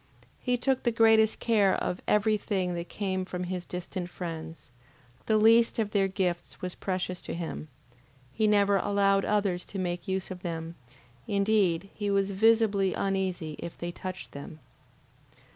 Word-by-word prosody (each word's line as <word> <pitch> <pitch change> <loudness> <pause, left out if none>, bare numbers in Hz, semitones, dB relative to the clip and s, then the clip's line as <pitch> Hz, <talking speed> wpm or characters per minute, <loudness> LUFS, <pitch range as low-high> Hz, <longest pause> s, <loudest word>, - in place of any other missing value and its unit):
He 250 -1 0
took 260 +1 +1
the 240 - +1
greatest 225 -1 +4
care 210 -5 +3
of 180 - -2
every 210 +1 +3
thing 190 -4 -1
that 170 0 -5
came 190 -2 -2
from 180 -1 -4
his 180 0 -4
distant 180 0 -5
friends, 165 -5 -7 0.6
the 220 - +4
least 230 +2 +5
of 215 -3 0
their 195 -2 +2
gifts 185 -3 -2
was 180 -1 -4
precious 185 -1 -3
to - - -6
him, 165 -2 -5 0.7
he 220 -1 +2
never 200 -1 +4
allowed 195 0 +2
others 200 -4 +1
to 200 - -7
make 175 -2 -3
use 190 0 -2
of 180 -1 -7
them, 165 -2 -4 0.5
indeed 200 -3 +1
he 205 -1 -3
was 200 0 +1
visibly 205 -2 +3
uneasy 185 -5 -2
if 170 - -7
they 175 0 -4
touched 185 +1 -7
them. 145 +2 -9
195 Hz, 160 wpm, -28 LUFS, 180-210 Hz, 0.7 s, least